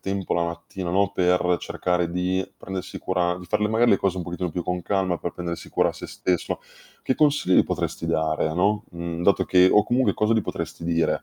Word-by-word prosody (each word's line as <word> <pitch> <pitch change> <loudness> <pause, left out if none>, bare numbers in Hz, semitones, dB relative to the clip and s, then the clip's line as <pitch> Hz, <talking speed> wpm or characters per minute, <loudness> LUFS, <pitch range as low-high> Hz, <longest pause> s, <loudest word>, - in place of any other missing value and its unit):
tempo 95 -1 -3
la 85 - +1
mattina, 85 +2 -5
no, 100 +2 +2
per 90 -1 +2
cercare 90 -1 -1
di 90 +2 0
prendersi 95 0 -6
cura 90 -1 0
di 90 - -10
far 85 - 0
le 105 - +2
magari, 115 +2 +3
le - - +6
cose 95 -2 0
un 90 - -2
pochettino 90 +1 -3
più 90 +2 -3
con 90 -1 -2
calma 95 -1 0
per 85 - -3
prendersi 85 -1 -5
cura - - +2
sé - - -8
stesso. 90 -2 -1 0.5
Che 130 - +1
consigli 145 -11 +4
potresti - - -3
dare, 80 0 0
no, 105 +4 +1
mhmm, 85 0 -5
dato 100 - +3
che 90 0 +5
o 105 - +5
comunque 125 +3 +2
cosa 105 +1 +1
gli 110 - +3
potresti 85 -1 -5
dire? 85 -1 +1
90 Hz, 210 wpm, -24 LUFS, 85-100 Hz, 0.5 s, le